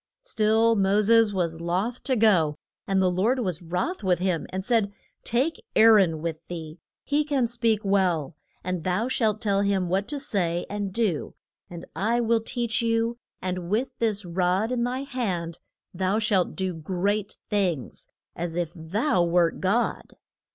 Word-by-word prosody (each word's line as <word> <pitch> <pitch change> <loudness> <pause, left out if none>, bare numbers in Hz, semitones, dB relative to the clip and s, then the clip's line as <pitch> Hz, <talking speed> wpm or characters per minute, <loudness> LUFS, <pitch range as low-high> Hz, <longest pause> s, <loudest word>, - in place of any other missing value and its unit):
Still 225 - +3
Mo 200 0 +3
ses 225 0 +4
was 170 -4 -2
loth 190 +9 -1
to 260 - +2
go, 185 -10 +3 0.3
and 195 -1 +2
the 185 -1 +3
Lord 210 +9 +1
was 185 -9 -2
wroth 180 - -3
with 180 -2 +2
him, 180 -3 -1
and 190 0 -4
said, 225 -4 +2 0.3
Take 265 +8 -1
Aa - - +6
ron 190 -8 +5
with 165 -2 -3
thee. 165 -1 -7 0.2
He 295 +1 +1
can 285 -4 +1
speak 225 -3 0
well. 180 -7 +1 0.3
And 180 -2 -3
thou 185 +6 0
shalt 220 -4 0
tell 200 -2 +1
him 195 -3 +1
what 195 +3 0
to 290 -1 -3
say 175 -10 -1
and 205 -1 -3
do, 200 -7 -1 0.3
and 170 -1 -8
I 225 +5 +1
will 230 -1 +2
teach 235 -1 -1
you, 230 +1 0 0.2
and 180 -2 -3
with 235 +7 0
this 210 -4 0
rod 180 +5 0
in 240 -1 0
thy 255 +2 -2
hand 190 - -3 0.3
thou 190 +3 0
shalt 210 -4 +1
do 190 -2 -2
great 195 +5 -2
things, 180 - -1 0.3
as 170 -1 -4
if 175 -2 -2
thou 185 - 0
wert 170 -1 +2
God. 205 +6 0
200 Hz, 165 wpm, -25 LUFS, 175-230 Hz, 0.3 s, Aa